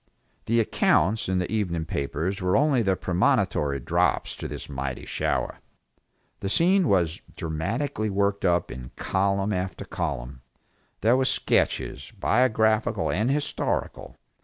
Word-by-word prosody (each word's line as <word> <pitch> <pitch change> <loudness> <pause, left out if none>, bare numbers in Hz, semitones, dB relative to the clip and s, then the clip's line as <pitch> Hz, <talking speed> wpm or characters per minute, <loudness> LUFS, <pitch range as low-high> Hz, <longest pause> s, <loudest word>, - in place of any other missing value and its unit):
The 115 +1 +2
accounts 105 -2 +2
in 95 - +1
the 90 -1 -2
evening 90 -7 -1
papers 80 +7 -2
were 90 +1 +2
only 140 -3 +3
the 95 -3 +2
premonitory 90 - +1
drops - - +1
to - - -5
this - - -7
mighty 65 -2 -4
shower. - - -2 0.8
The 95 - -3
scene 180 - +3
was 85 -6 +1 0.2
dramatically 110 - -2
worked 100 0 0
up 90 -2 +2
in 65 -1 -8
column 100 +1 0
after 95 0 -3
column. 65 -6 -4 0.6
There 115 +4 +4
were 130 - +2
sketches, 70 - 0
biographical 110 -1 +2
and 110 +7 +1
historical. 145 +1 -2
95 Hz, 130 wpm, -26 LUFS, 80-110 Hz, 0.8 s, There